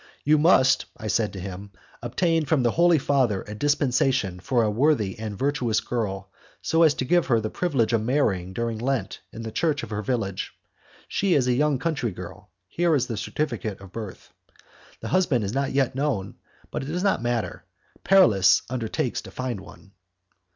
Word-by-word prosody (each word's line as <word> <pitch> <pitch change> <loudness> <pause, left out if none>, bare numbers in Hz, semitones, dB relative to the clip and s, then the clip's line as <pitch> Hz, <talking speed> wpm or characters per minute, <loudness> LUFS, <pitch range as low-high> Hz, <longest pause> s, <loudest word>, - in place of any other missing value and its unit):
"You 150 +1 +4
must," 135 -5 +4
I 110 - -9
said 110 0 +1
to 95 - -6
him, 95 +2 -7 0.3
"obtain 160 +7 0
from 140 -2 +2
the 120 - +3
Holy 170 +2 +4
Father 130 -8 +1
a 105 - -8
dispensation 130 -6 +1
for 115 +6 +1
a 105 - +1
worthy 110 -5 +1
and 110 -2 -5
virtuous 130 -5 0
girl, 100 -5 -4 0.3
so 165 - +1
as 155 -3 +5
to 130 - -2
give 175 +5 +2
her 115 -3 +3
the 110 0 -4
privilege 135 -11 0
of 115 - +2
marrying 105 -8 0
during 115 +2 -3
Lent 125 -5 -2
in 115 - -8
the 110 - -5
church 160 +5 0
of - - -7
her 105 0 -2
village; 105 -4 -3 0.5
she 190 -3 +1
is 130 -3 +2
a 125 - +3
young 145 +2 +2
country 140 -4 -1
girl. 95 +2 -10 0.2
Here 170 - +1
is 130 -3 0
her 115 - -2
certificate 110 -5 -3
of 100 -1 -13
birth. 105 -3 -8 0.7
The - - -5
husband 165 - +2
is 100 +2 -3
not 135 0 -1
yet 135 -2 +1
known; 130 -8 -2 0.4
but - - -3
it 135 - -6
does 175 +4 -2
not 200 - +2
matter, 120 -2 -2 0.4
Paralis 115 - +5
undertakes 120 -4 -2
to - - -11
find 130 -5 -4
one." 100 - -15
120 Hz, 185 wpm, -25 LUFS, 105-145 Hz, 0.7 s, as